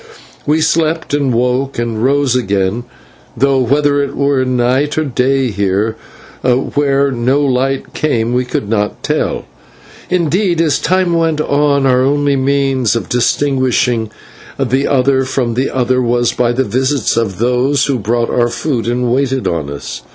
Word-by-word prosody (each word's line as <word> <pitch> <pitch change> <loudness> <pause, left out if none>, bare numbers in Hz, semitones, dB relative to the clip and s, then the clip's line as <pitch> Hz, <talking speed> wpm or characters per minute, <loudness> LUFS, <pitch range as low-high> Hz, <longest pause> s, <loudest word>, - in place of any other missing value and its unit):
We 155 +2 +2
slept, 160 -1 0
and 140 -3 +1
woke, 125 +3 0
and 115 -1 -2
rose 140 -1 +2
again, 100 0 -1 0.5
though 135 +1 +2
whether 145 +3 +2
it 140 - -3
was 140 -2 +1
night 130 +4 0
or 155 - +2
day 135 -1 0
here, 100 +2 -1 0.5
where 140 +2 +1
no 130 +3 +1
light 135 +1 -1
came, 120 -6 0
we 125 +1 +1
could 125 -4 -3
not 105 -1 -2
tell; - - -1 0.6
indeed, 175 +1 +1
as 160 -4 +2
time 185 +1 +1
went 165 -2 +1
on, 145 -2 +1
our 130 -1 +3
only 145 +1 +1
means 135 -4 +1
of 110 -6 -3
distinguishing 125 -3 +1 0.5
the 135 +1 0
one 135 0 +2
from 130 -2 -1
the 130 +3 -1
other 130 0 0
was 120 0 +1
by 120 -1 +1
the 130 +2 0
visits 130 0 0
of 110 -5 -1
those 125 +4 +1
who 135 -3 -1
brought 115 +3 -1
our 120 -1 +1
food 125 -2 -2
and 120 0 0
waited 135 -1 0
on 80 -4 -2
us. 70 -3 -7
130 Hz, 155 wpm, -14 LUFS, 120-140 Hz, 0.6 s, our